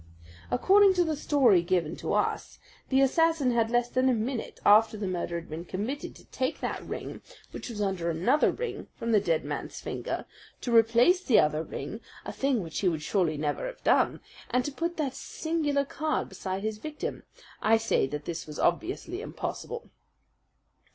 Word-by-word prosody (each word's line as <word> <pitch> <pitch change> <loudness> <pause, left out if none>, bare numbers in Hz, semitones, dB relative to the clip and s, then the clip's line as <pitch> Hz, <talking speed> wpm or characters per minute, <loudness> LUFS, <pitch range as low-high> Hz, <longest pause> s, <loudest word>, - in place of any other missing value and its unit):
According 390 +7 +5
to 355 - +4
the 320 -2 -1
story 265 - +4
given 170 -2 0
to - - -3
us, - - -1 0.3
the 265 0 +4
assassin 315 -1 +3
had 230 -1 +2
less 240 0 +2
than 255 +1 +2
a 250 - +3
minute 230 +2 -3
after 215 +1 +6
the 205 - -3
murder 175 -2 -2
had 170 - -13
been 160 +2 -6
committed 210 +11 -4
to - - -16
take 260 0 -2
that - - -3
ring, - - -6 0.3
which - - -7
was 215 -3 -5
under 190 -4 -1
another 205 - +3
ring, 485 - -5
from 230 0 -3
the 215 - +6
dead 165 -5 0
man's - - -5
finger, - - -4 0.4
to 240 -2 0
replace 235 - +5
the 245 - +5
other 150 0 +2
ring 160 +7 -6 0.2
a - - -5
thing 270 -6 0
which 165 -2 -5
he 190 - +3
would 155 -3 -3
surely 165 -4 +1
never 145 - -2
have - - -9
done - - +3 0.3
and 250 0 +1
to 290 - -2
put 335 +4 -3
that 285 -5 -1
singular 300 -4 -1
card 310 +2 -2
beside 190 +1 -4
his 215 -1 -3
victim. 300 +4 -5 0.4
I 225 +1 +5
say 225 -11 +1
that 150 +2 -5
this 170 -2 -5
was 150 - -8
obviously 355 - -1
impossible. 470 +1 -6
230 Hz, 185 wpm, -28 LUFS, 180-290 Hz, 0.4 s, after